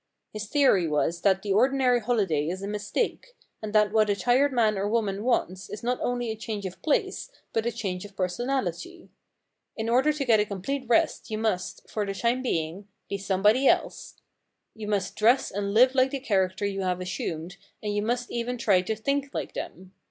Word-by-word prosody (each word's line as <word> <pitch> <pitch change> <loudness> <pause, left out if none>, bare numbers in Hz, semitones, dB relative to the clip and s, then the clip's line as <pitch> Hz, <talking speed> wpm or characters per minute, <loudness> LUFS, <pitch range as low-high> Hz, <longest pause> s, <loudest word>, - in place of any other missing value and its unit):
His 215 -1 -5
theory 205 - +3
was 160 +3 0
that 190 -1 +2
the 200 -2 0
ordinary 250 +2 +3
holiday 200 -11 0
is 185 +3 -4
a - - -3
mistake, 210 - -3 0.3
and 215 -1 -5
that 210 -1 +4
what 215 -1 +3
a 205 - +2
tired 245 +7 +3
man 225 -4 +2
or 200 +1 -1
woman 210 -3 0
wants 190 -6 -1
is 210 - -7
not 245 +1 0
only 245 -2 -1
a - - -4
change 215 -2 -5
of 185 -1 -7
place 305 - 0 0.2
but 225 +1 0
a - - +1
change 195 -6 -4
of 205 -1 -12
personality. 245 - -3 0.7
In 220 0 -2
order 260 +6 +4
to 295 -2 -3
get 225 -4 +5
a 210 - +2
complete 255 +8 -3
rest 235 - +2
you 215 - -2
must, 215 -5 -2
for 215 - -2
the 195 -1 -4
time 240 +4 0
being, 180 -4 -2 0.2
be 200 - -3
somebody 205 +7 +3
else. - - 0 0.6
You 220 -2 -7
must 200 -3 -1
dress 235 +5 +3
and 200 0 -2
live 250 +5 +5
like 260 0 +3
the 275 - -3
character 195 -5 0
you 195 -1 -2
have 180 -1 -1
assumed 180 -1 -4 0.3
and 205 -1 -2
you 205 - +1
must 240 +3 -2
even 240 +1 -2
try 200 -6 +3
to 220 +4 -2
think 275 +5 -1
like - - -3
him. 185 0 -7
215 Hz, 200 wpm, -26 LUFS, 195-245 Hz, 0.7 s, get